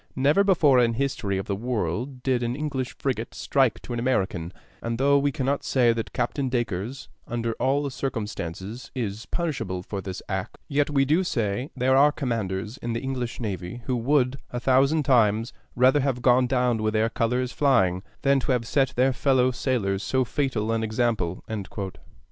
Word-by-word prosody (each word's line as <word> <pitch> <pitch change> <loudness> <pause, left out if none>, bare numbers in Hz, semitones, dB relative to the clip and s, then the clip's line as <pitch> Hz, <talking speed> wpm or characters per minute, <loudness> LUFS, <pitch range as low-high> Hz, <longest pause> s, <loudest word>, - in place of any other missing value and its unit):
Never 145 +9 +4
before 160 -9 +4
in 115 -1 +3
the - - -6
history 125 -8 -1
of 95 - -3
the 100 - -2
world 120 - -3
did 130 -2 +1
an 120 0 -1
English 140 -3 -3
frigate 120 -4 -3
strike 135 -5 +1
to 120 - -6
an 120 - -2
American; 95 -8 0 0.3
and 115 0 -2
though 140 +2 +4
we 140 0 +1
cannot 135 +1 -1
say 120 -3 +3
that 115 -1 -4
Captain 130 +2 -1
Dacres, 120 0 -3 0.2
under 115 -1 -2
all 140 +2 +1
circumstances, 110 -4 -5
is 110 -2 -4
punishable 115 - -2
for 100 +1 -5
this 95 -1 -6
act, - - -4
yet 145 +1 +1
we 135 -2 +2
do 160 +7 +3
say 115 - -1
there 130 0 +2
are 145 +2 +6
commanders 110 -5 -3
in 120 0 -4
the 115 - -1
English 130 -3 -3
navy 105 +1 -5
who 130 - 0
would 125 +2 +2
a 120 - -4
thousand 135 +5 +3
times 115 -4 +3 0.2
rather 130 +4 +5
have 130 -3 -1
gone 125 0 +5
down 125 -3 +1
with 110 0 0
their 110 +1 +3
colors 125 +2 0
flying, 95 -11 +2 0.2
than 140 -1 +3
have 125 -3 0
set 135 +2 +1
their 130 +2 +3
fellow 130 -1 +3
sailors 110 -7 -1
so 130 +2 +1
fatal 120 -5 -1
an 115 0 0
example." 110 -5 -1
125 Hz, 175 wpm, -25 LUFS, 110-135 Hz, 0.3 s, are